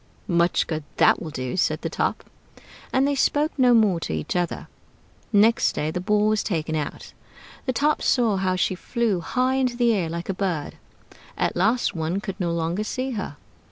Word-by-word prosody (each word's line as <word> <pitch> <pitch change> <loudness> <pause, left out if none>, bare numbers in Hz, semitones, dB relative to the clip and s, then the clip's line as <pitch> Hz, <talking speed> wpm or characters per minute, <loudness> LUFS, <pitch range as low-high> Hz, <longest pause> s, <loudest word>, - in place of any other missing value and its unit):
"Much 170 -2 +2
good 155 -2 -3
that - - +4
will 165 - -5
do!" 130 -4 -4
said 185 - +1
the - - 0
Top. - - -2 0.7
And 265 +1 +3
they 285 - +1
spoke 290 +2 +1
no 255 -3 +4
more 210 -6 +3
to 120 - -4
each 80 - -3
other. 175 -1 -2 0.6
Next 220 +2 +4
day 155 +1 -1
the 180 - -3
Ball 210 +2 +2
was 215 -1 +2
taken 160 -5 -2
out. 150 -2 -5 0.5
The 255 - +1
Top 295 +5 +1
saw 230 -6 +2
how 185 -1 0
she 185 - +1
flew 220 +1 -1
high 255 +9 0
into 255 -2 0
the 240 -1 +3
air, 180 -6 -1
like 170 +1 -5
a 195 - -1
bird; 180 -6 -3 0.6
at - - 0
last 220 +7 +2
one 165 +2 -2
could 200 -1 -6
no 175 -2 0
longer 170 +4 -1
see 255 +4 -3
her. 195 - -5
195 Hz, 195 wpm, -24 LUFS, 170-235 Hz, 0.7 s, that